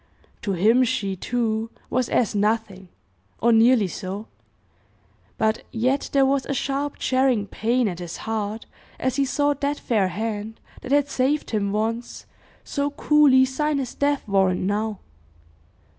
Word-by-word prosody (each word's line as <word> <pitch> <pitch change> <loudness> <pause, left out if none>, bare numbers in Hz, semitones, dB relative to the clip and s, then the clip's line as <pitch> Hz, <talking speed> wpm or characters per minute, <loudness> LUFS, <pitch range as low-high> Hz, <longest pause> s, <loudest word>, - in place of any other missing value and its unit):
To 200 - -2
him 220 +8 +4
she, 200 -5 -1
too, 225 +1 -1 0.2
was 255 -1 0
as 230 - +1
nothing, 205 -3 -1 0.5
or 235 - +3
nearly 225 -1 +5
so; 190 +4 -6 1.1
but 220 0 +1
yet 255 +4 0
there 275 -1 +4
was 270 0 +1
a 280 - -2
sharp 280 +2 -2
jarring 255 -5 +1
pain 235 +4 0
at 180 -3 -4
his 175 -2 -6
heart, 220 0 -3 0.3
as 260 0 -1
he 280 - +2
saw 290 +2 +1
that 285 +1 -2
fair 210 -6 +1
hand, 215 +3 -4 0.2
that 255 - -7
had 285 0 +3
saved 280 +3 0
him 200 -3 0
once, 225 +3 -3 0.4
so 285 0 -2
coolly 290 -3 +4
sign 295 +3 -1
his 260 -3 -3
death 285 -3 0
warrant 190 -2 +2
now. 205 +2 -2
230 Hz, 145 wpm, -23 LUFS, 210-270 Hz, 1.1 s, nearly